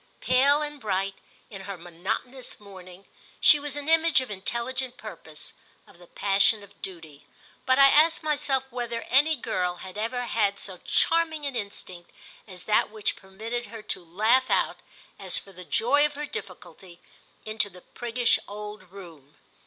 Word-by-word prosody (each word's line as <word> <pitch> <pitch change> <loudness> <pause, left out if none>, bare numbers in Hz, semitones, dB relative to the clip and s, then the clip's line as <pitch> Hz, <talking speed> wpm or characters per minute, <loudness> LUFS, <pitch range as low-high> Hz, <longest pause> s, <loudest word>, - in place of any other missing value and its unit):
Pale 280 +4 +3
and 295 -2 -6
bright, 195 -2 -1 0.4
in 195 -2 -8
her 200 -1 -6
monotonous 185 +9 -5
mourning, 190 -2 -13 0.3
she 300 - +8
was 290 0 -4
an 290 0 -6
image 325 -1 +4
of 260 -4 -5
intelligent 240 +6 -3
purpose, 160 -8 -9 0.3
of 170 - -20
the 175 - -16
passion 200 +3 +3
of 200 0 -18
duty; 160 -6 -7 0.4
but 260 0 +4
I 275 - +9
asked 310 +4 +5
myself 285 -3 0
whether 235 -1 -4
any 295 +5 +4
girl 180 -8 -2
had 190 +3 -9
ever 245 +3 -2
had 205 -4 0
so 185 -3 -4
charming 320 -2 +1
an 275 -2 -3
instinct 185 -5 -6 0.4
as 180 -3 -9
that 215 - +2
which 215 -1 -2
permitted 220 +5 -6
her 220 0 -10
to 185 - -4
laugh 215 +10 +2
out, - - +1 0.4
as - - +1
for 195 - +4
the 180 -1 -11
joy 270 +11 +3
of 295 -1 0
her 295 +1 -4
difficulty, 180 - -9 0.5
into 215 -1 +1
the 180 -2 -15
priggish 240 +3 +1
old 210 -2 -8
room. 165 -8 -13
215 Hz, 160 wpm, -26 LUFS, 190-260 Hz, 0.5 s, I